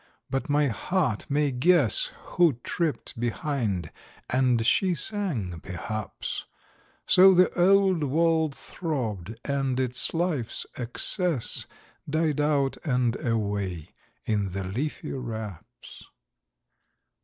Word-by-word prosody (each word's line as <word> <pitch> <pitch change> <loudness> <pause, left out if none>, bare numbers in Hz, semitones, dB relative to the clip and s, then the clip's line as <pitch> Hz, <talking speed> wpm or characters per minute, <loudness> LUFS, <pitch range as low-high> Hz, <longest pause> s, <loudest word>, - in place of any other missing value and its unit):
But 135 +4 -2
my 145 0 +3
heart 130 - -1
may 145 0 +1
guess 140 - +4 0.2
Who 170 -4 +4
tripped 160 -8 -3
behind; 120 - -2 0.4
and 125 -3 +2
she 185 +7 +3
sang 150 - -2
perhaps: 105 +5 -5 0.6
So, 190 +1 +7
the 180 +1 +5
old 190 -2 +3
wall 160 +2 +2
throbbed, 115 - -4
and 135 -2 -1
its 125 -1 +2
life's 160 -9 -1
excess 135 - +1 0.4
Died 155 -1 0
out 140 -3 +1
and 125 -5 +1
away 100 - -2 0.4
in 100 -4 -1
the 100 0 -3
leafy 120 +12 -4
wraps! 110 -8 -8
135 Hz, 100 wpm, -26 LUFS, 110-160 Hz, 0.6 s, So